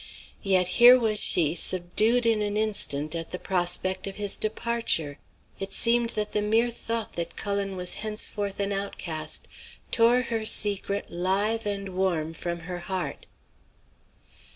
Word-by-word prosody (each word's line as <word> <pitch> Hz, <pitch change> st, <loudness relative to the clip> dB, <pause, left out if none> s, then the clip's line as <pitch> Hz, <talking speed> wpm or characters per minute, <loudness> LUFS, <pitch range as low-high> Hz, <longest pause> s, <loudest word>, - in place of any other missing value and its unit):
Yet 185 Hz, -2 st, +2 dB
here 245 Hz, +1 st, +10 dB
was 220 Hz, -4 st, +1 dB
she 160 Hz, -3 st, +3 dB
subdued 210 Hz, +8 st, +1 dB
in 225 Hz, -2 st, +2 dB
an 205 Hz, 0 st, -1 dB
instant 155 Hz, -9 st, 0 dB
at 165 Hz, -1 st, -5 dB
the -, -, -5 dB
prospect 185 Hz, +1 st, 0 dB
of 195 Hz, -, -5 dB
his 205 Hz, -1 st, -1 dB
departure! 215 Hz, -10 st, 0 dB, 0.4 s
It 195 Hz, 0 st, -5 dB
seemed 235 Hz, +2 st, +3 dB
that 210 Hz, 0 st, -1 dB
the 210 Hz, -, 0 dB
mere 225 Hz, +3 st, +2 dB
thought 230 Hz, -1 st, -4 dB
that 170 Hz, 0 st, -5 dB
Cullen 200 Hz, -1 st, -2 dB
was 180 Hz, -1 st, -2 dB
henceforth 210 Hz, -2 st, -3 dB
an 200 Hz, 0 st, 0 dB
outcast 170 Hz, -6 st, -4 dB, 0.4 s
tore 240 Hz, +2 st, +4 dB
her 230 Hz, -2 st, -2 dB
secret 200 Hz, -2 st, 0 dB
live 200 Hz, +5 st, 0 dB
and 200 Hz, -1 st, -3 dB
warm 180 Hz, -4 st, -1 dB
from 170 Hz, +1 st, -5 dB
her 175 Hz, +1 st, -6 dB
heart. 180 Hz, -5 st, -5 dB
200 Hz, 145 wpm, -26 LUFS, 180-220 Hz, 0.4 s, here